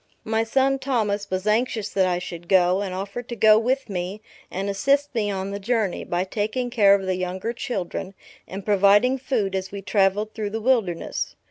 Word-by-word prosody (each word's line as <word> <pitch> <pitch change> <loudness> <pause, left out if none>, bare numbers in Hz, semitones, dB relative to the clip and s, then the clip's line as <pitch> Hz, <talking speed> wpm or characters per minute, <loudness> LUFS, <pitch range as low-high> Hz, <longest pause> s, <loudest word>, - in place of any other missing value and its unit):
My 220 0 0
son, 270 +4 +1
Thomas, 210 -7 -1
was 185 +1 -2
anxious 220 -1 0
that 190 -2 +2
I 180 -1 +1
should 175 -1 -7
go; 185 0 +4
and 195 -2 -3
offered 200 +6 -5
to 240 - -4
go 215 -1 +6
with 260 +4 0
me 185 0 -4 0.3
and 195 +2 -3
assist 275 +9 +1
me 215 -4 0
on 195 0 -3
the 200 - -4
journey, 215 -2 -1
by 175 +1 -1
taking 220 +6 -2
care 205 -5 +6
of 195 -1 -3
the 185 -1 -1
younger 185 +5 -3
children, 195 -5 -4 0.3
and 195 +1 -7
providing 205 +6 +4
food 235 -7 -1
as 190 0 -3
we 200 -1 -7
travelled 205 +2 +1
through 215 -2 -3
the 220 +2 -3
wilderness. 220 -8 0
205 Hz, 195 wpm, -24 LUFS, 190-230 Hz, 0.3 s, go